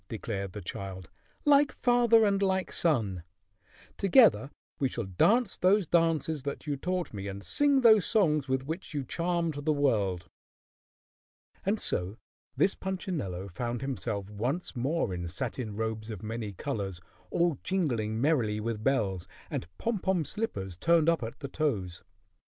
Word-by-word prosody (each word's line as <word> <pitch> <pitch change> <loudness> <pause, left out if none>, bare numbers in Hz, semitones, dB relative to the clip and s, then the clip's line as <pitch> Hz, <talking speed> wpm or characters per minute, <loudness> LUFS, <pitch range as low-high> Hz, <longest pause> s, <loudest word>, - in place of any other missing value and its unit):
declared 100 -4 -4
the 105 - -7
child, 95 0 -7 0.3
"like 290 0 +5
father 240 -2 +4
and 200 -1 +2
like 190 -1 0
son. 110 - +1 0.8
Together 200 - +5 0.3
we 135 - +1
shall 120 - -3
dance 200 - +2
those 195 +2 +3
dances 160 -2 +1
that 140 +3 -5
you 145 -2 -1
taught 180 +3 -3
me 100 -1 -5
and 100 0 -6
sing 285 - +3
those 220 -5 +7
songs 155 -9 +2
with 130 0 0
which 160 +1 -5
you 140 - -1
charmed 170 +2 -1
the 155 - +2
world." 105 - +1 1.4
And 205 +3 0
so 90 +5 0 0.4
this 195 - +4
Punchinello 165 - -4
found 120 +6 -3
himself 115 -7 -3
once 125 - -3
more 130 - 0
in 85 -1 -4
satin 110 +3 -4
robes 110 0 -3
of 105 -3 -7
many 110 -1 -4
colors, 100 -5 -4 0.3
all 170 -5 +1
jingling 120 - -1
merrily 120 -7 +1
with 110 -1 -3
bells, 100 -10 0 0.2
and - - -3
pom 230 -3 -1
pom 180 -4 0
slippers 100 - -4
turned 165 - +4
up 165 -4 +2
at 115 +3 -6
the 140 - -4
toes. 100 - -2
135 Hz, 150 wpm, -29 LUFS, -, 1.4 s, those